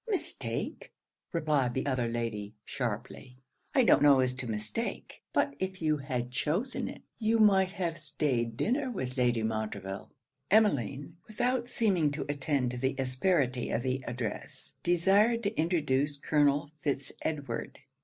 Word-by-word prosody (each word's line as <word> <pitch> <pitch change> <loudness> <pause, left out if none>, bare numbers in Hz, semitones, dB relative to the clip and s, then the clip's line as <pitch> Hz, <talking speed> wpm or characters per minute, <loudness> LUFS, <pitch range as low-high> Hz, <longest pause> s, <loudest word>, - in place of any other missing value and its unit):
'Mistake!' 405 -5 -1 0.4
replied 150 -7 +1
the 130 - -1
other 130 -4 0
lady, 115 -3 -3
sharply; 125 +1 -4 0.4
'I 260 - +6
don't - - +5
know 145 -2 +7
as 130 -1 +2
to 130 -1 -6
mistake; 105 -1 -3
but 140 - +1
if 190 0 -3
you 155 -2 +1
had 125 -3 -3
chosen 175 - 0
it, - - -9 0.2
you 225 0 +2
might 195 -3 +5
have 170 -4 -2
staid 125 -7 -1
dinner 260 +3 0
with 130 - -4
Lady 120 -3 +2
Montreville.' 105 -3 -3 0.4
Emmeline, 155 - +2
without 245 +3 0
seeming 190 -12 +2
to 145 - -3
attend 140 -3 0
to 125 - -5
the 130 +2 0
asperity 130 -1 +1
of 120 - -1
the 130 0 -1
address, 120 -3 -4
desired 200 +7 +3
to 205 +2 -1
introduce 150 -4 +1
Colonel 145 0 +2
Fitz 140 -2 -1
Edward. 145 -3 -3
140 Hz, 145 wpm, -30 LUFS, 125-185 Hz, 0.4 s, know